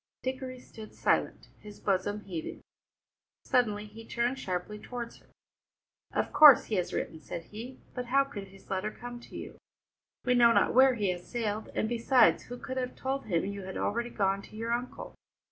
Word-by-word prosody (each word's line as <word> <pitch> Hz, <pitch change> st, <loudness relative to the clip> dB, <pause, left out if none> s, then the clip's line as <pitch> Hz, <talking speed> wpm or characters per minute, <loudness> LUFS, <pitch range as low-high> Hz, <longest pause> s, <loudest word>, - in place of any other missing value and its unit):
Dickory 260 Hz, 0 st, -4 dB
stood 220 Hz, -3 st, -12 dB
silent, -, -, 0 dB
his 210 Hz, -1 st, -12 dB
bosom 205 Hz, +1 st, 0 dB
heaving. 175 Hz, -6 st, -6 dB, 0.8 s
Suddenly 210 Hz, -4 st, +2 dB
he 220 Hz, +2 st, -11 dB
turned 240 Hz, +3 st, -1 dB
sharply 185 Hz, +1 st, -3 dB
towards 240 Hz, +1 st, -6 dB
her. -, -, -24 dB, 0.8 s
"Of -, -, -1 dB
course 295 Hz, -5 st, +9 dB
he 215 Hz, -, -2 dB
has 180 Hz, -, -1 dB
written," 160 Hz, -, -3 dB
said 165 Hz, -, -6 dB
he, 235 Hz, +7 st, -9 dB
"but 250 Hz, -1 st, -4 dB
how 275 Hz, +3 st, +4 dB
could 210 Hz, -8 st, -8 dB
his 195 Hz, 0 st, -17 dB
letter 190 Hz, +2 st, 0 dB
come 240 Hz, +2 st, -8 dB
to -, -, -11 dB
you? -, -, -8 dB, 0.7 s
We 250 Hz, -, +3 dB
know 235 Hz, -1 st, +6 dB
not -, -, +3 dB
where 260 Hz, 0 st, +6 dB
he 205 Hz, -4 st, 0 dB
has 180 Hz, 0 st, -7 dB
sailed, 220 Hz, -2 st, -2 dB
and 220 Hz, -, +1 dB
besides, 240 Hz, +1 st, +4 dB
who 245 Hz, -, -7 dB
could 260 Hz, +1 st, -6 dB
have 250 Hz, -1 st, -2 dB
told 270 Hz, +1 st, -3 dB
him 170 Hz, -4 st, 0 dB
you 200 Hz, 0 st, -4 dB
had 190 Hz, 0 st, -6 dB
already 235 Hz, +3 st, -1 dB
gone 195 Hz, -3 st, 0 dB
to 215 Hz, -, -14 dB
your 225 Hz, +2 st, -3 dB
uncle? 245 Hz, +1 st, -4 dB
225 Hz, 185 wpm, -30 LUFS, 200-250 Hz, 0.8 s, course